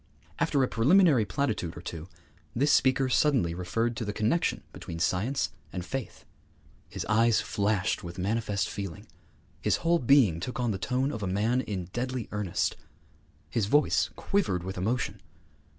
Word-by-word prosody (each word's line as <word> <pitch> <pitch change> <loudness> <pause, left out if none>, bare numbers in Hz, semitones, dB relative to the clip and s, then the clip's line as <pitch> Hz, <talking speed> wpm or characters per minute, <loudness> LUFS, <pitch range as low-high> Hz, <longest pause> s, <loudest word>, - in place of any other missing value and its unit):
After 140 - +2
a - - +2
preliminary 140 - +4
platitude 105 -5 -2
or - - -7
two, 85 -1 -7 0.5
this 145 +5 +3
speaker 130 0 +3
suddenly 125 - +2
referred 115 +7 -1
to - - -2
the 105 - -2
connexion 110 +11 0
between 85 - -7
science 95 +10 0 0.2
and 90 -1 -5
faith. 135 +1 -6 0.6
His - - -5
eyes 115 +1 +3
flashed 100 -2 0
with 85 +1 -7
manifest 100 0 -1
feeling; 100 -5 -6 0.6
his - - +2
whole 170 0 +4
being 120 - +4
took 125 +8 -5
on 120 -2 +1
the 95 - -3
tone 130 +5 0
of 110 - -5
a 100 - -2
man 110 +7 +1
in 95 -7 -4
deadly 125 -1 -3
earnest; 105 -4 -1 0.7
his 110 -4 -1
voice 145 +7 +3
quivered 140 - 0
with 95 +1 -5
emotion. 100 0 -2
110 Hz, 155 wpm, -28 LUFS, 95-130 Hz, 0.7 s, preliminary